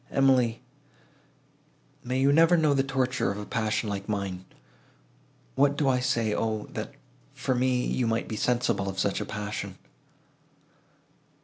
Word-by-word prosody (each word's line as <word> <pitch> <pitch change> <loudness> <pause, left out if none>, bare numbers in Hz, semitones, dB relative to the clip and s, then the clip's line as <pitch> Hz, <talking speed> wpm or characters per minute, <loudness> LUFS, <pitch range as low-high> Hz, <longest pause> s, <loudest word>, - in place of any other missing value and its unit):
Emily—may 130 +1 0
you 140 +1 +4
never 165 +3 +5
know 155 -3 +3
the 135 - +3
torture 130 -1 0
of 100 - -5
a 105 - -6
passion 110 0 -1
like 100 0 -4
mine! 95 -3 -3 1.1
What 145 0 +2
do 145 - +1
I 130 -1 +3
say? 120 -4 0
O, 110 -1 -1
that, - - -5 0.4
for 130 - -1
me, 125 0 +1
you 125 - 0
might 115 0 -1
be 110 - -4
sensible 115 -3 0
of 95 - -6
such 95 +1 0
a - - -3
passion!" 105 +1 -5
120 Hz, 140 wpm, -27 LUFS, 105-130 Hz, 1.1 s, never